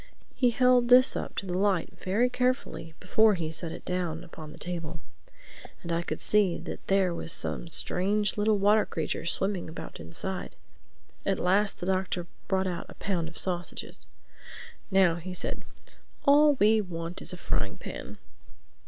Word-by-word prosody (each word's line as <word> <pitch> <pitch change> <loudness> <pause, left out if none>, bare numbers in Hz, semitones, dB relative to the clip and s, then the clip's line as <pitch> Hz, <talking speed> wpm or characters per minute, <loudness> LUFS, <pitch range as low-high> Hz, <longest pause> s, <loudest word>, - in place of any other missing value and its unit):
He 250 - +3
held 250 0 +4
this 255 +2 +7
up - - -5
to - - -3
the 180 -1 -3
light 190 -2 +1
very 210 +7 +1
carefully 250 -10 -2
before 215 +3 +3
he 160 -3 -3
set 160 0 -3
it 170 - -9
down 175 -2 -2
upon 160 -3 -10
the - - -12
table; 165 -2 -5 0.8
and 170 - -5
I 170 0 +1
could 155 -2 -5
see 205 -5 +3
that - - -8
there 195 -2 +2
was 165 - 0
some 170 - -1
strange 200 +5 +3
little 210 0 +2
water 205 +2 +4
creature 160 0 -4
swimming 190 -1 +1
about 160 - -9
inside. 135 - -5 0.7
At 195 -1 0
last 195 +3 +1
the - - -5
Doctor 185 -2 -1 0.2
brought 190 -1 +1
out 180 -2 -4
a - - -11
pound 180 -5 -2
of 160 - -11
sausages. 175 -2 -4 0.8
"Now," 190 -4 +4
he 180 +2 -7
said, - - -4 0.6
"all 295 +1 +6
we 220 -3 +4
want 170 -2 -6
is - - +1
a 180 - -7
frying - - -2
pan." - - -8
185 Hz, 165 wpm, -28 LUFS, 170-210 Hz, 0.8 s, this